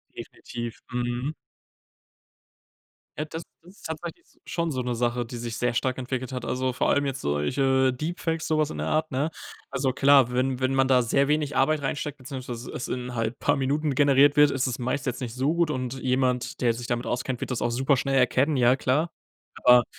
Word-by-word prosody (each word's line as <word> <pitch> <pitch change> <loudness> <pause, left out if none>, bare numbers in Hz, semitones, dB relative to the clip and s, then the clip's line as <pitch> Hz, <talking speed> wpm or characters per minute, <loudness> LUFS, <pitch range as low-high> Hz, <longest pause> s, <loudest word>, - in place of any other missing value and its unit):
Definitiv, 120 -1 -7
mhm. 125 +3 -2 1.8
Ja, 150 - -2
das 160 +2 -7 0.2
ist 180 +4 -17
tatsächlich 160 +1 -6
s - - -29
schon 170 -1 -1
so 130 -3 -2
'ne 120 -1 -2
Sache, 120 +1 0
die 120 +1 -7
sich 115 -1 -5
sehr 120 0 0
stark 130 +1 0
entwickelt 130 0 -3
hat. 125 -2 -4
Also, 130 0 -1
vor - - +1
allem 145 - +2
jetzt 135 -1 -3
solche 130 - +2
Deepfakes, 165 +3 -3
sowas 155 -1 +1
in 75 - -6
der 75 - -2
Art, 155 0 0
ne? 140 +4 0 0.4
Also 135 -1 0
klar, 135 -2 +5
wenn 130 +1 0
wenn 130 +1 +1
man 135 0 +3
da 125 -2 +4
sehr 140 +4 +2
wenig 150 -1 0
Arbeit 145 +2 +2
reinsteckt, 145 +1 -3
beziehungsweise 125 -2 -7
es - - -5
in 125 0 -4
halt 115 0 -2
paar 145 - +2
Minuten 145 +2 0
generiert 140 +1 +5
wird, 150 0 +6
ist 135 -1 0
es 125 - -3
meist 130 +2 -2
jetzt 125 0 -3
nicht 120 -2 -5
so 135 +5 +1
gut 170 -2 +2
und 130 -3 -2
jemand, 125 -1 0
der 120 -2 +3
sich 120 +1 -7
damit 120 0 -1
auskennt, 125 0 -2
wird - - -4
das 125 - -2
auch - - +1
super 135 +3 +2
schnell 135 +1 0
erkennen, 130 +3 +3
ja 125 0 +5
klar. 145 +5 0 0.5
Aber, 125 -1 +7
130 Hz, 205 wpm, -26 LUFS, 125-145 Hz, 1.8 s, Aber